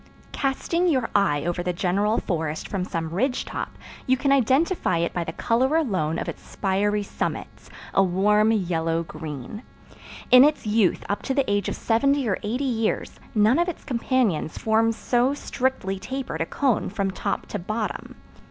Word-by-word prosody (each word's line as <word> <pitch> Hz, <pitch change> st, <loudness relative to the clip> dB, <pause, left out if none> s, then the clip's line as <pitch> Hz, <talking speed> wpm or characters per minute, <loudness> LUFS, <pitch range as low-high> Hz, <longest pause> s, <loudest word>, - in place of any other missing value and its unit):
Casting 335 Hz, +6 st, 0 dB
your 260 Hz, -8 st, +1 dB
eye 170 Hz, -8 st, +2 dB
over 175 Hz, 0 st, -1 dB
the 180 Hz, 0 st, -1 dB
general 200 Hz, +5 st, +1 dB
forest 160 Hz, -4 st, -2 dB
from 195 Hz, -3 st, -2 dB
some 165 Hz, -3 st, -3 dB
ridge 250 Hz, +9 st, 0 dB
top -, -, -4 dB, 0.4 s
you 260 Hz, 0 st, +3 dB
can 275 Hz, +1 st, +1 dB
identify 275 Hz, -, +2 dB
it 170 Hz, +1 st, -1 dB
by 175 Hz, -, -1 dB
the 165 Hz, -, -5 dB
color 255 Hz, -, +1 dB
alone 185 Hz, -, 0 dB
of -, -, -3 dB
its -, -, -6 dB
spiry 205 Hz, +1 st, 0 dB
summits, -, -, -5 dB, 0.2 s
a -, -, +5 dB
warm 210 Hz, +4 st, +3 dB
yellow 165 Hz, -5 st, 0 dB
green. 155 Hz, -, -7 dB, 0.7 s
In 250 Hz, +1 st, +10 dB
its 295 Hz, -3 st, +2 dB
youth 210 Hz, -3 st, +2 dB
up 205 Hz, -, -2 dB
to 265 Hz, -, -2 dB
the 275 Hz, -2 st, +1 dB
age 205 Hz, -1 st, 0 dB
of -, -, -3 dB
seventy 275 Hz, +3 st, +1 dB
or 190 Hz, -, 0 dB
eighty 240 Hz, +6 st, -2 dB
years, 230 Hz, -4 st, -1 dB, 0.2 s
none 215 Hz, +7 st, +4 dB
of 345 Hz, +1 st, +2 dB
its 345 Hz, -, -7 dB
companions 235 Hz, -, 0 dB
forms 225 Hz, +1 st, +2 dB
so 250 Hz, +4 st, +1 dB
strictly 250 Hz, -9 st, -2 dB
tapered 265 Hz, +4 st, -4 dB
a -, -, -1 dB
cone 265 Hz, -6 st, 0 dB
from 195 Hz, -1 st, -1 dB
top -, -, -3 dB
to 205 Hz, -, -3 dB
bottom. 215 Hz, +5 st, -4 dB
215 Hz, 170 wpm, -24 LUFS, 180-260 Hz, 0.7 s, In